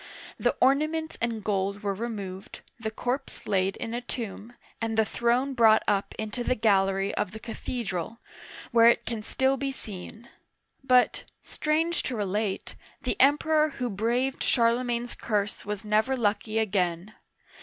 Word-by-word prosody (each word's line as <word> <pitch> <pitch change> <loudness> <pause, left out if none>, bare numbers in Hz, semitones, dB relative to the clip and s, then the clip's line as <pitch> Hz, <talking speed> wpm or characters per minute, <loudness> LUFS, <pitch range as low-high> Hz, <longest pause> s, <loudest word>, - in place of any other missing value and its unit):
The - - +2
ornaments 310 +5 +2
and 230 -2 -1
gold 200 0 -1
were 200 -1 0
removed, 200 -3 -6 0.2
the 220 -1 -2
corpse 250 +5 -4
laid 195 -1 +1
in 230 - -5
a 240 - -2
tomb, 235 -2 -6 0.3
and 225 -1 -1
the 220 - +4
throne 245 +5 +1
brought 225 -3 +5
up 200 -1 0
into 220 +3 -3
the 255 - +1
gallery 195 -3 +2
of 185 - -2
the 220 - -7
cathe 235 +1 -5
dral, 185 +4 -3 0.5
where 230 -1 +7
it 235 - +4
can 230 -2 -3
still 265 +5 +1
be 275 +1 -2
seen. 220 -1 -9 0.6
But, 250 -2 +3 0.2
strange 325 +3 0
to 255 - -3
relate, 205 -1 -2 0.3
the - - 0
Emperor 305 +3 +4
who 245 -3 -2
braved 240 +6 0
Charlemagne's 240 0 +1
curse 210 -2 -2
was 210 0 -4
never 220 +5 +2
lucky 215 -1 0
again. 190 -2 0
225 Hz, 150 wpm, -27 LUFS, 205-250 Hz, 0.6 s, where